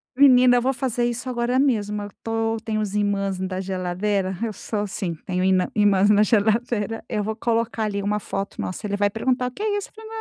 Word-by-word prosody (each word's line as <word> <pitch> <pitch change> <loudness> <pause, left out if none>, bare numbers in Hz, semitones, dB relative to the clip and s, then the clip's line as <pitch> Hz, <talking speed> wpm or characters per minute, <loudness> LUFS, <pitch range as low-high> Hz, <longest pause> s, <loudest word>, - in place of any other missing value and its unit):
Menina, 255 -2 +6
eu - - +2
vou 265 +2 +1
fazer 245 -1 -1
isso 240 +2 -3
agora 245 +1 0
mesmo. 210 -7 +1
Eu 205 - -7
tô 225 0 -1
tem 220 -1 -1
os 210 -2 -2
imãs 200 -2 0
da 185 0 -3
geladeira 190 +1 -1
eu 230 - -1
sou 210 +2 -4
assim. 195 -4 -3
Tenho 180 -1 -1
ina 185 -1 +2
imãs 205 -1 +4
na 210 0 +5
geladeira. 225 0 +1
Eu 210 -3 -1
vou 220 +1 -3
colocar, 230 -1 -1
ali, 200 -1 -2
uma 210 +1 0
foto 195 0 -5
nossa, 185 +4 -5
ele 205 0 -1
vai 205 0 +2
perguntar: 250 +4 0
"O - - -5
que 410 - -7
é 410 -1 +1
isso?" 405 - -5
Eu - - -34
falo: - - -9
210 Hz, 225 wpm, -23 LUFS, 200-240 Hz, -, Menina